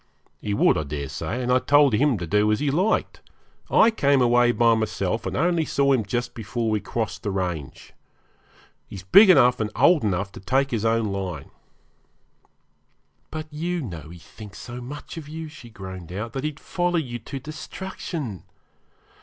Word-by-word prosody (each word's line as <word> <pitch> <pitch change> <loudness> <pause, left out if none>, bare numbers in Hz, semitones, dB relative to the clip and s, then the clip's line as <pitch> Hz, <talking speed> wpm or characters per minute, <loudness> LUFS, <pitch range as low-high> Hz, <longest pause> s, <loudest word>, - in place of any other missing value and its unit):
'He 100 -1 -2
would, - - +3
I - - -2
daresay, 75 - -4
and 125 - 0
I 130 - +5
told 145 -1 +4
him 135 +2 +3
to 90 - -4
do 105 +5 +2
as 105 - +1
he 145 -1 0
liked. 185 +9 0 0.5
I 230 - +5
came 140 -10 +2
away 120 0 +4
by 120 -1 +4
myself, 110 -1 -1
and - - -3
only 170 -1 +2
saw 140 -2 +2
him 125 -4 +2
just 120 +4 -3
before 115 +1 -3
we 105 - +1
crossed 115 +2 -4
the 105 - -3
range. 90 -8 -4 0.9
He's 95 - -9
big 195 - +7
enough 125 -8 +6
and 110 -1 -1
old 150 +6 +4
enough 100 -1 -1
to - - -10
take 135 +7 0
his 115 -2 -1
own 115 -2 +1
line.' 90 -7 -5 1.8
'But 155 0 -5
you 175 +3 -2
know 85 -8 -7
he 85 - -11
thinks 105 +4 -12
so 125 0 -8
much 145 +6 -8
of 150 -3 -8
you,' 160 +1 -6
she 135 -6 -12
groaned 95 -5 -9
out, 105 +5 -5
'that 135 +2 -3
he'd 155 -1 -4
follow 175 -1 -1
you 120 -7 -3
to 135 +5 -7
destruction. 155 - -6
120 Hz, 180 wpm, -24 LUFS, 100-145 Hz, 1.8 s, big